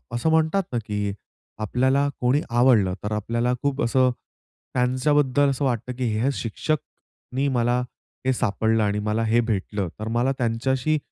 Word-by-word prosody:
असं 160 +7 +1
म्हणतात 160 +5 +2
ना, 120 - 0
की 105 -1 -2 0.5
आपल्याला 130 +6 +2
कोणी 130 +5 +3
आवडलं 120 -6 +4
तर 105 - -3
आपल्याला 115 +3 0
खूप 140 -1 0
असं 130 +1 +3 0.6
त्यांच्याबद्दल 135 +2 +2
असं 135 +1 -1
वाटतं, 125 0 -1
की 130 - -1
हे 135 +4 +2
शिक्षकनी 135 +2 -4
मला 120 0 +2 0.5
हे 130 - +3
सापडलं 110 -1 +1
आणि 105 0 0
मला 105 +2 0
हे 115 +2 +3
भेटलं, 105 -4 -2
तर 110 - -4
मला 120 +4 +1
त्यांच्याशी 130 +5 0
125 Hz, 145 wpm, -24 LUFS, 110-135 Hz, 0.6 s, आवडलं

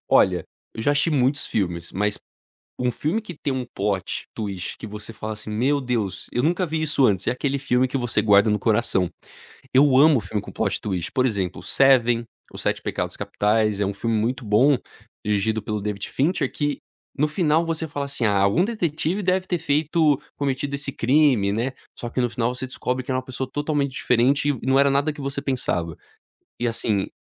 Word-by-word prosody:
Olha, - - +4 0.3
eu 110 - -5
já 145 - +3
assisti 145 +3 +2
muitos 140 0 +1
filmes, 85 -4 -2
mas 105 +2 -1 0.6
um 125 0 +1
filme 160 - -1
que 185 -6 -9
tem 140 - -2
um 130 -1 -3
plot 100 -2 -2
twist 100 -4 -4
que - - -7
você 105 +2 -7
fala 110 0 -5
assim: 110 0 -8
"Meu 130 +7 +1
Deus, 110 -8 -2
eu 120 - 0
nunca 175 +4 +1
vi 160 0 -2
isso 140 -4 +3
antes", 95 -3 +1
é - - +3
aquele 140 +2 -1
filme 130 -1 +1
que 135 - -2
você 120 -2 0
guarda 100 0 +5
no 105 - +2
coração. 105 -4 +1 0.7
Eu 135 -1 +6
amo 145 -3 +6
filme 100 +2 -3
com - - -10
plot - - -1
twist 95 -5 -3
por 130 -1 +2
exemplo, 95 -7 -2
Seven, 120 -4 +4 0.3
Os - - -6
Sete - - -1
Pecados - - -3
Capitais, 105 -1 +1
é 100 - +2
um 100 - -2
filme 115 +2 -1
muito 120 +4 -1
bom, 125 +7 +4 0.5
dirigido 105 +1 0
pelo 105 -1 -3
David 100 -1 -4
Fincher 140 -1 0
que 145 -1 -1 0.4
no 145 +2 +2
final 160 0 +2
você 160 0 -2
fala 140 -1 -3
assim: 140 -4 -2
"Ah, 100 -2 +3
algum 100 - +3
detetive 185 -3 -1
deve 185 0 +1
ter 175 - 0
feito 150 0 +2 0.2
cometido 140 0 -2
esse 140 0 -2
crime", 130 -6 +3
né, 120 +5 -1 0.3
só 120 - -4
que 130 - -1
no 120 -1 +1
final 120 +1 -1
você 130 +1 -5
descobre 125 0 -3
que 130 - -6
era 130 - +1
uma 130 - -4
pessoa 130 0 -5
totalmente 145 -2 -1
diferente 130 +4 +2
e 135 -3 -2
não 135 0 +4
era 140 0 +5
nada 140 +3 +2
que 145 - -11
você 140 0 -3
pensava. 90 - -1 0.6
E 120 - 0
assim, 110 -4 0
130 Hz, 205 wpm, -23 LUFS, 105-145 Hz, 0.7 s, Eu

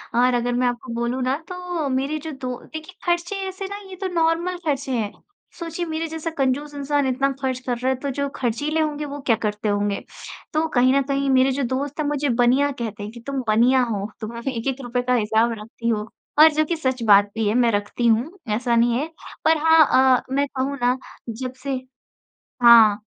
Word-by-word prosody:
और 250 +1 +4
अगर 245 0 0
मैं 250 0 +1
आपको 245 0 -4
बोलूँ 235 +2 -2
ना 260 +2 +1
तो 355 -5 -4
मेरे 275 +4 -1
जो - - -4
दो 255 -3 -5 0.2
देखिए 315 +4 -8
ख़र्चे 345 +3 0
ऐसे 380 +1 -6
ना 405 +1 -6
ये 375 - -8
तो 380 - -1
नॉर्मल 335 +2 +1
ख़र्चे 275 -3 -1
हैं। 220 -4 -1 0.5
सोचिए 335 +1 -4
मेरे 320 0 -3
जैसा 320 +1 -4
कंजूस 280 +2 0
इंसान 285 0 0
इतना 275 +2 +1
ख़र्च 260 -1 -1
कर 245 -2 -1
रहा 255 +2 -1
है - - +1
तो 280 - -3
जो 280 +2 -2
ख़र्चीले 280 +6 -1
होंगे 300 -1 -2
वो 285 0 -6
क्या 230 - +4
करते 210 0 -1
होंगे, 205 0 0 0.5
तो 315 +1 +1
कहीं 255 -3 +3
न 275 - +3
कहीं 275 0 0
मेरे 265 0 +4
जो 275 +1 -1
दोस्त 285 +3 -3
हैं 300 - 0
मुझे 290 -1 0
बनिया 250 +4 +3
कहते 225 -5 -5
हैं 210 - -6
कि 235 - -11
तुम 275 -2 -2
बनिया 240 +4 +4
हो, 210 -3 -3
तुम 220 +1 -5
हमे 260 +3 -3
एक-एक 265 +3 -2
रूपय 245 0 -1
का 250 0 0
हिसाब 225 0 +2
रखती 230 +2 -5
हो 215 -1 -1 0.3
और 315 +1 +9
जो 310 +1 +2
कि 340 - -1
सच 260 -6 -2
बात 205 0 +6
भी 225 -2 0
है 205 - +2
मैं 240 -2 +4
रखती 205 +3 -1
हूँ, 230 +5 +2 0.3
ऐसा 240 0 0
नहीं 235 +1 +3
है। 300 - -2 0.4
पर 320 0 +5
हाँ 320 -1 +7 0.3
अ, - - -5
मैं 280 +1 +1
कहूँ 275 +2 -1
ना 245 +1 +2 0.3
जब 250 +3 -5
से 280 - -3 0.9
हाँ, 220 -3 +7
260 Hz, 215 wpm, -22 LUFS, 235-295 Hz, 0.9 s, और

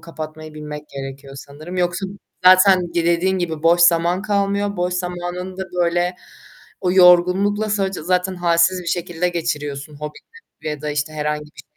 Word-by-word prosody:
kapatmayı 155 -1 -8
bilmek 150 0 -8
gerekiyor 135 0 -8
sanırım. 155 +6 -9
Yoksa 180 +2 -1 0.4
zaten 185 -1 +6
dediğin 175 +2 +1
gibi 160 -3 -3
boş 170 +1 +4
zaman 170 +2 +3
kalmıyor. 200 -1 0
Boş 180 0 -1
zamanında 180 +1 -4 0.2
böyle 175 +1 0 0.7
o 180 -2 0
yorgunlukla 190 +4 +4
sadece 195 -4 -1
zaten 180 +2 0
halsiz 175 +1 +2
bir - - -13
şekilde 175 0 -1
geçiriyorsun 150 -4 -4
hobiyle 155 - -9
ya 150 - -7
da 150 - -2
işte 150 +1 -2
herhangi 150 0 -2
bir 150 - -14
175 Hz, 145 wpm, -20 LUFS, 155-185 Hz, 0.7 s, zaten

